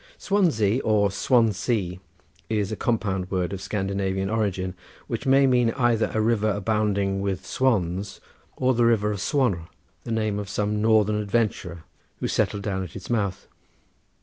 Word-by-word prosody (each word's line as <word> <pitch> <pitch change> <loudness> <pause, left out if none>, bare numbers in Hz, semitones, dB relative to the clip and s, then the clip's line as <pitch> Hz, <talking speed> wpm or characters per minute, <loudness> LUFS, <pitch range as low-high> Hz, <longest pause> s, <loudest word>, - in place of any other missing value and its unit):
Swansea 135 - +2
or 105 -2 +2
Swansey 110 -5 +1 0.5
is 105 -3 0
a - - -1
compound 100 -5 -1
word 95 -1 -1
of 95 - -5
Scandinavian 95 -1 -2
origin, 95 -4 -1 0.3
which - - -4
may 135 +1 +5
mean 125 -3 +3
either 120 -4 +2
a 110 - -1
river 110 -1 +2
abounding 100 -1 0
with 100 -2 -2
swans, 100 -6 0 0.4
or 130 0 +2
the 120 0 +2
river 105 -2 +2
of 100 - -4
Swanr, 100 - 0 0.4
the 115 - -6
name 110 -2 0
of 100 -1 -6
some 105 0 -1
northern 110 -1 +3
adventurer 100 -6 -1 0.4
who - - -1
settled 100 -1 0
down 95 -2 -2
at 90 - -9
its 95 +4 -7
mouth. 100 -5 -1
105 Hz, 150 wpm, -25 LUFS, 95-115 Hz, 0.5 s, may